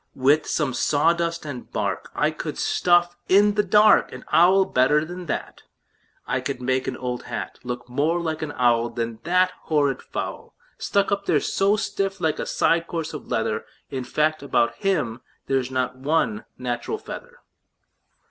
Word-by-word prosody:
"With 145 +4 +3
some 145 -5 0
sawdust 170 +5 +1
and 135 -5 -7
bark - - -2
I - - +2
could - - -6
stuff 175 0 +2
in 205 +2 +5
the 210 - +3
dark 210 +2 +5
An - - -10
owl 190 +3 +5
better 150 +3 +3
than 175 +1 -8
that. - - -4 0.6
I - - -1
could - - -4
make 130 +1 0
an - - -3
old 125 -1 -3
hat 115 -5 -5
Look 125 -1 -5
more 145 +7 0
like 160 -2 -3
an 155 -2 -3
owl 120 -1 +2
Than 115 -1 -4
that 180 +1 +3
horrid 145 -4 +1
fowl, - - -6 0.2
Stuck 200 0 +1
up 200 0 -1
there 150 - +4
so 195 +7 +2
stiff 195 -2 -2
like 160 -3 0
a - - -3
side 165 0 +2
of 165 - -20
coarse 165 -2 -4
leather. - - -2 0.3
In 130 -2 -3
fact, 155 +4 0
about 120 -4 +1
him 150 -12 -1 0.2
there's 135 -2 0
not 130 -1 -1
one 130 -6 0
natural 125 - -3
feather." 485 +2 -9
155 Hz, 165 wpm, -24 LUFS, 125-180 Hz, 0.6 s, in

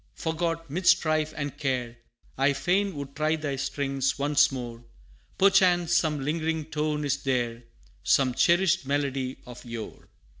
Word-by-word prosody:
forgot 165 0 -2
'mid 170 +6 -3
strife 155 -4 +3
and 145 -1 -4
care, 125 -4 -2 0.4
I 135 +2 +2
fain 190 +5 0
would 140 -1 -7
try 155 +1 +1
thy 150 -3 -3
strings 135 0 -1
once 145 +1 +3
more, 120 -3 -6 0.5
Perchance 180 -3 +4
some 150 -4 +1
lingering 160 +1 -1
tone 150 -1 -2
is 140 0 -1
there 120 -3 -1 0.4
Some 130 +7 +3
cherished 175 +5 +3
melody 135 -2 -1
of 125 -1 -11
yore. 115 -3 -8
145 Hz, 140 wpm, -27 LUFS, 135-160 Hz, 0.5 s, Perchance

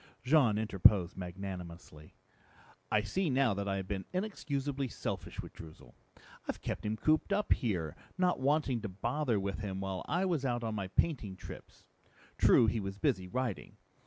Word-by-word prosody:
Jean 130 -6 +4
interposed 100 -4 +4
magnanimously, 90 -4 -7 0.8
"I 105 - +4
see 185 - 0
now 130 -4 +3
that 100 +1 -3
I 100 - 0
have 95 -1 -4
been 95 -1 -3
inexcusably 145 -8 -2
selfish - - -4
with - - -10
Droozle. 80 -7 -12 0.5
I've - - -3
kept - - -3
him 110 +1 -1
cooped 155 - +2
up 205 +1 +3
here, 85 - -1 0.2
not 180 -4 +2
wanting 135 -3 +2
to 105 - -4
bother 120 +4 0
with 100 +1 -3
him 95 -3 -3
while 95 -2 -3
I 175 +5 +2
was 170 -7 0
out 120 -2 0
on 110 -1 -2
my 100 -3 -2
painting 105 - 0
trips. 90 - -11 0.5
True, 120 - +7
he 110 +1 +1
was 100 -1 -4
busy 95 -1 +1
writing. 120 0 -3
110 Hz, 165 wpm, -33 LUFS, 95-140 Hz, 0.8 s, True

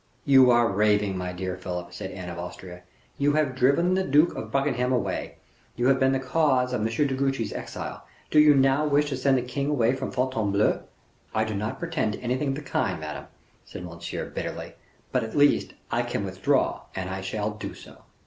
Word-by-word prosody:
"You 130 -2 +7
are 120 -1 +5
raving, 105 -1 +2
my 90 0 -3
dear 90 0 -4
Philip," 90 -1 -6
said 95 +1 -6
Anne 90 -1 -7
of 85 0 -6
Austria; 90 0 -8 0.4
"you 145 +1 +3
have 150 -3 +1
driven 140 +8 +3
the 190 0 +2
Duke 150 +2 +4
of - - -6
Buckingham 135 -3 +1
away; 125 - -1 0.4
you 120 - -1
have 135 -1 +4
been 130 0 +4
the 135 - +1
cause 130 -2 +1
of 120 - 0
M. 110 - +1
de 115 +6 +1
Guiche's 135 -3 -1
exile; - - -6 0.3
do 155 - +5
you 150 -1 +7
now 135 +2 +4
wish 145 0 +2
to 135 - -2
send 135 +1 +2
the 125 - -1
king 140 +3 -2
away 125 -5 +2
from 130 0 -3
Fontainebleau?" 110 -6 +1 0.5
"I 110 - +3
do 110 -1 -3
not 105 +2 -3
pretend 165 -11 -1
to - - -6
anything 125 +4 -1
of 135 - -1
the 150 - -5
kind, 85 - -1
madame," 75 -3 -6 0.4
said - - -9
Monsieur, 85 0 -6
bitterly; - - -5 0.4
"but, - - +1
at 110 - -5
least, 145 0 +3 0.2
I - - +2
can - - -3
withdraw, - - 0
and 95 -1 -3
I 95 0 -4
shall 105 +2 -2
do 105 - -7
so." - - -14
125 Hz, 205 wpm, -26 LUFS, 100-140 Hz, 0.5 s, You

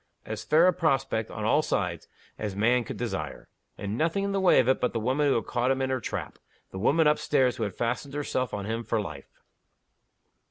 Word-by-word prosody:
As 110 0 -5
fair 160 +3 +4
a 185 - +5
prospect, 135 -9 0
on 110 - -6
all 145 +8 +4
sides, 90 - -2 0.3
as 105 -3 -3
man 120 +4 +3
could - - -7
desire. - - -4 0.3
And 105 +3 -4
nothing 165 +5 +1
in 200 - -1
the 195 -1 0
way 185 - +6
of 125 - +3
it 130 - +2
but 125 - 0
the 115 - -1
woman 130 +6 +1
who 140 - +3
had 115 - -1
caught 120 +1 0
him 135 0 +1
in 130 0 -1
her 130 - 0
trap - - -5 0.3
the 95 - -6
woman 155 +10 +3
up 150 0 +4
stairs 130 -4 +2
who 115 - -2
had 100 - -5
fastened 125 +4 -2
herself 130 -4 -1
on 100 -1 -4
him 115 +2 -3
for 115 - 0
life. 75 -9 -7
125 Hz, 230 wpm, -27 LUFS, 110-145 Hz, 0.3 s, way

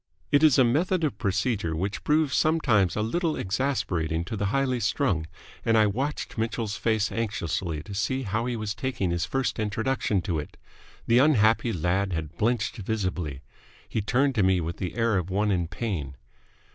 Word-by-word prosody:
It 145 - +5
is 155 -4 +6
a 130 - +7
method 165 +9 +1
of 135 -9 -1
procedure 95 -3 0
which 95 +5 -3
proves 150 -2 +2
sometimes 120 - +3
a 105 - 0
little 165 +8 0
exasperating 95 - -1
to 100 - -4
the 100 -1 -1
highly 130 +2 +1
strung, 100 - 0 0.4
and 115 0 +3
I 110 - +5
watched 130 +4 -2
Mitchell's 110 -1 -2
face 110 -2 0
anxiously 90 -8 -2
to 100 - -9
see 130 +7 -1
how 110 +3 -1
he 125 - -1
was 110 -2 -3
taking 115 -7 -2
his 85 -1 0
first 135 -4 -1
introduction 110 -2 0
to 85 -2 -1
it. 75 - -8 0.5
The 115 +1 +4
unhappy 115 -5 +4
lad 95 +2 0
had 80 -1 -4
blenched 110 +2 0
visibly. 95 -9 -3 0.5
He 110 - -2
turned 130 +7 +2
to 110 - +1
me 95 -1 +3
with 85 0 -4
the 90 - -4
air 115 -4 +2
of 90 0 -5
one 105 +2 +1
in 90 -3 0
pain. 85 - -4
105 Hz, 180 wpm, -26 LUFS, 95-125 Hz, 0.5 s, a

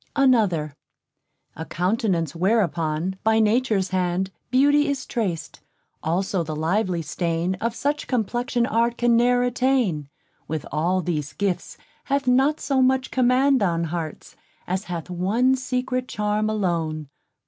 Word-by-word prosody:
_ - - -30
Another 210 - +2 0.8
_A 160 - -7
countenance 180 -4 0
whereon, 180 -2 0
by 220 0 +3
natures 215 -3 +2
hand, 185 0 -1 0.2
Beauty 290 +3 +4
is 280 -2 -2
trac'd, 195 -10 -3 0.4
also 185 +3 0
the 155 -2 -4
lively 175 +2 0
stain 170 +2 -1
Of 230 +1 -1
such 290 +3 -2
complexion 240 0 0
art 235 +1 +1
can 240 -1 +3
ne'er 245 +1 +3
attain, 245 - +1 0.4
With 155 -2 -4
all 175 +5 +1
these 150 -4 -3
gifts 195 -3 -2 0.3
hath 280 0 0
not 270 +5 +3
so 275 -2 +1
much 260 0 +2
command 260 +1 +3
On 170 -4 +1
hearts, 165 -1 -5 0.3
as 190 +3 -2
hath 170 -3 -5
one 210 +9 +2
secret 255 0 -2
charm 210 0 -1
alone. 165 -7 -1
210 Hz, 135 wpm, -23 LUFS, 170-250 Hz, 0.8 s, Beauty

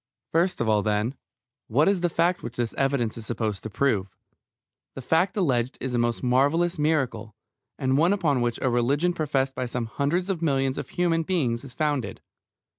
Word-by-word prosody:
First 175 +3 +1
of 120 - 0
all, 105 -1 +3
then, 105 +3 0 0.5
what 135 +7 +3
is 195 -2 +2
the 175 - +2
fact 170 +2 +1
which 120 - -7
this 120 -2 -2
evidence 130 -5 0
is 110 - -9
supposed 110 -4 -2
to 110 - -6
prove? 105 -5 +1 0.9
The 135 - -6
fact 180 - +1
alleged 130 - +1
is 130 -2 -3
a 120 - +1
most 120 +1 0
marvellous 145 +7 +2
miracle, 130 -9 0 0.4
and 135 0 +1
one 170 +4 +4
upon 155 -10 +1
which 120 -1 0
a 130 - +3
religion 140 +9 +2
professed 135 -5 0
by 125 -1 -3
some 120 -1 -3
hundreds 155 - -1
of 175 -4 -3
millions 135 -4 +1
of - - -6
human 170 -2 +1
beings 140 -9 0
is 130 -3 -9
founded. 145 -5 -1
135 Hz, 190 wpm, -25 LUFS, 120-165 Hz, 0.9 s, one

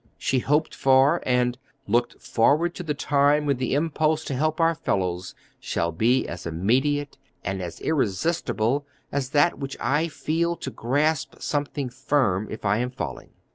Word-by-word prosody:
She 130 - +1
hoped 150 +5 +1
for 135 +5 +4
and 125 0 +1 0.3
"looked 120 +3 +1
forward 155 +9 +2
to - - -6
the 155 -4 -2
time 145 +1 +2
when 140 -2 +1
the 130 +1 -1
impulse 155 +1 +1
to - - -3
help 155 +5 0
our 165 0 +4
fellows 95 - -2 0.2
shall 85 0 -1
be 115 +10 +2
as 85 0 -6
immediate 135 - 0 0.3
and 95 0 -2
as 85 -2 -6
irresistible 140 - 0 0.2
as 135 -2 -1
that 145 +4 +3
which 135 -1 -5
I 145 +7 +1
feel 165 +2 -1
to 135 - -6
grasp 145 +5 0
something 145 -3 -2
firm 125 -6 +1
if 110 - -7
I 100 +2 +2
am 125 +1 -1
falling." 80 - -6
135 Hz, 160 wpm, -25 LUFS, 115-150 Hz, 0.3 s, for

